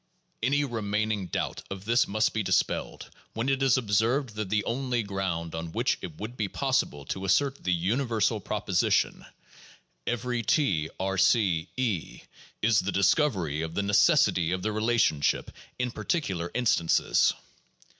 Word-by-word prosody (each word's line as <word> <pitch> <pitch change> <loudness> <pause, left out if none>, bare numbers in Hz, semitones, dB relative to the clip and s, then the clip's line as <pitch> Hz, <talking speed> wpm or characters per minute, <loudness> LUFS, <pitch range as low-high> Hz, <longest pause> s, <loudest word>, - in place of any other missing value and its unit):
Any 140 +5 +2
remaining 105 -4 -2
doubt - - -3
of 100 0 -7
this 120 +2 +3
must 110 +2 +1
be 110 - 0
dispelled, 100 - -1 0.2
when 115 +4 -1
it 135 0 0
is 135 -1 +4
ob 115 -5 -4
served 120 +6 +2
that 105 -2 -4
the 105 +1 +1
only 125 -1 -1
ground 95 -5 -3
on 80 0 -5
which - - 0
it 80 - -7
would 110 +4 -6
be 110 -4 -1
possible 70 -6 -1
to 95 - -4
assert 135 +9 +1
the 90 - 0
universal 110 +5 +1
proposition, - - 0 0.8
every 120 0 -1
(T)R 95 - 0
C 95 -5 +2
(E), 115 -10 -2 0.4
is 110 -1 +4
the 95 +2 -1
discovery 95 - +1
of 80 0 -5
the 100 - 0
necessity 90 -4 +3
of 90 0 -2
the 110 - 0
relationship 110 -8 +1 0.3
in 125 -1 -1
particular 95 - -2
instances. 110 -9 +2
105 Hz, 145 wpm, -27 LUFS, 95-120 Hz, 0.8 s, is